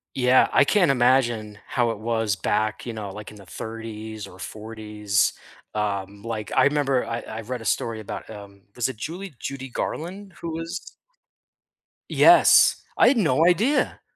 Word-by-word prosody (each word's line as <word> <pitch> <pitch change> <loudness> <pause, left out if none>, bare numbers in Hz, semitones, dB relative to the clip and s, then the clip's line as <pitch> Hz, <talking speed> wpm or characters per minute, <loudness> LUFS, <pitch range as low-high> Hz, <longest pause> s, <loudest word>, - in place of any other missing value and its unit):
Yeah, 130 0 +4
I 140 - +6
can't 180 -1 +3
imagine 120 -5 +2
how 120 -2 0
it 110 - -4
was 115 -2 0
back, 110 +3 -1
you 120 - -3
know, 105 -3 -6
like, 105 +1 -9
in 105 - -14
the 100 - -13
‘30s 110 0 -7
or 90 - -14
‘40s, 105 0 -2 0.4
um, 100 -1 -3
like, 110 -2 -5
I - - +6
remember 140 -3 +2
I 115 0 -3
I 110 0 -7
read 125 +2 -5
a - - -9
story 115 0 -1
about 105 - -7
um, 100 -2 -11
was 120 0 0
it 130 - -6
Julie 170 - -6
Judy 135 -1 -6
Garland 185 +9 -5
who 170 - -4
was 165 +1 -6 1.2
Yes, - - +6
I'd 255 - +5
no 160 - +3
idea. 220 - +2
115 Hz, 160 wpm, -24 LUFS, 105-140 Hz, 1.2 s, I